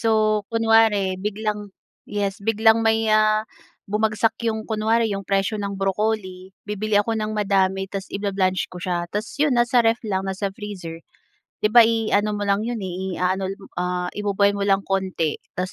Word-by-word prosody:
So 225 Hz, -, +1 dB, 0.4 s
kunware 225 Hz, -2 st, +4 dB, 0.3 s
biglang 210 Hz, 0 st, -2 dB, 0.6 s
yes 200 Hz, -1 st, 0 dB
biglang 220 Hz, +1 st, +4 dB
may, 220 Hz, 0 st, +3 dB, 0.2 s
ah, 215 Hz, 0 st, +2 dB, 0.5 s
bumagsak 215 Hz, +1 st, +1 dB
'yong 220 Hz, -1 st, 0 dB
kunwari 225 Hz, +1 st, +2 dB
'yog 195 Hz, -1 st, -3 dB
presyo 195 Hz, +2 st, +1 dB
ng 200 Hz, -1 st, -3 dB
broccoli, 195 Hz, -1 st, -1 dB, 0.3 s
bibili 210 Hz, +1 st, -2 dB
ako 230 Hz, -, -4 dB
ng 215 Hz, 0 st, -2 dB
madami 195 Hz, -1 st, +1 dB
tas 195 Hz, -1 st, -4 dB
i-bla-blanch 195 Hz, -2 st, 0 dB
ko -, -, -8 dB
siya 180 Hz, -1 st, 0 dB
tapos 210 Hz, +2 st, -3 dB
'yon 300 Hz, -4 st, +3 dB
nasa 240 Hz, +1 st, +2 dB
ref 230 Hz, +1 st, +2 dB
lang, 190 Hz, -1 st, 0 dB
nasa 190 Hz, +1 st, -2 dB
freezer. 190 Hz, -6 st, -7 dB, 0.7 s
'Di 210 Hz, -, +4 dB
ba 240 Hz, -, +10 dB
i-ano 215 Hz, -1 st, +1 dB
mo 205 Hz, -, -3 dB
lang 200 Hz, 0 st, +2 dB
'yon 240 Hz, -1 st, -2 dB
eh 185 Hz, 0 st, -4 dB
i-a-ano 185 Hz, +1 st, 0 dB
lang, 195 Hz, -1 st, -15 dB, 0.2 s
ah, 180 Hz, 0 st, -2 dB
i-bo-boil 200 Hz, 0 st, +2 dB
mo 200 Hz, -, -1 dB
lang 195 Hz, 0 st, +3 dB
konti 185 Hz, -5 st, 0 dB, 0.3 s
tapos 185 Hz, +1 st, -2 dB
205 Hz, 170 wpm, -22 LUFS, 190-220 Hz, 0.7 s, ba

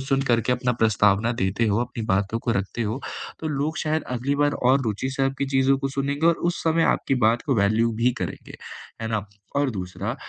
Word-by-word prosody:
सुन 135 Hz, 0 st, 0 dB
करके 120 Hz, -2 st, +2 dB
अपना 125 Hz, 0 st, 0 dB
प्रस्तावना 105 Hz, +1 st, +3 dB
देते 95 Hz, +5 st, +1 dB
हो, 105 Hz, 0 st, +2 dB
अपनी 120 Hz, -1 st, -4 dB
बातों 100 Hz, +3 st, 0 dB
को 115 Hz, -, -2 dB
रखते 100 Hz, +3 st, -2 dB
हो, 110 Hz, +5 st, -2 dB, 0.4 s
तो 160 Hz, -, -3 dB
लोग 150 Hz, +2 st, -2 dB
शायद 155 Hz, 0 st, 0 dB
अगली 135 Hz, +4 st, -1 dB
बार 145 Hz, 0 st, +2 dB, 0.2 s
और 135 Hz, +1 st, +4 dB
रुचि 115 Hz, +3 st, -2 dB
से 135 Hz, +1 st, -2 dB
आपकी 135 Hz, +1 st, -1 dB
चीज़ों 135 Hz, +1 st, +3 dB
को 135 Hz, -, -2 dB
सुनेंगे 140 Hz, +3 st, -1 dB
और 170 Hz, -, +5 dB, 0.2 s
उस 175 Hz, -, -6 dB
समय 165 Hz, 0 st, +3 dB
आपकी 135 Hz, -, -1 dB
बात 115 Hz, +2 st, +2 dB
को 140 Hz, -, +2 dB
वैल्यू 110 Hz, +3 st, +2 dB
भी 125 Hz, -, +5 dB
करेंगे, -, -, -6 dB, 0.5 s
है 110 Hz, -, -2 dB
ना। 110 Hz, -3 st, -2 dB, 0.3 s
और 140 Hz, -1 st, +2 dB
दूसरा, 95 Hz, -4 st, -4 dB
125 Hz, 210 wpm, -24 LUFS, 110-140 Hz, 0.5 s, और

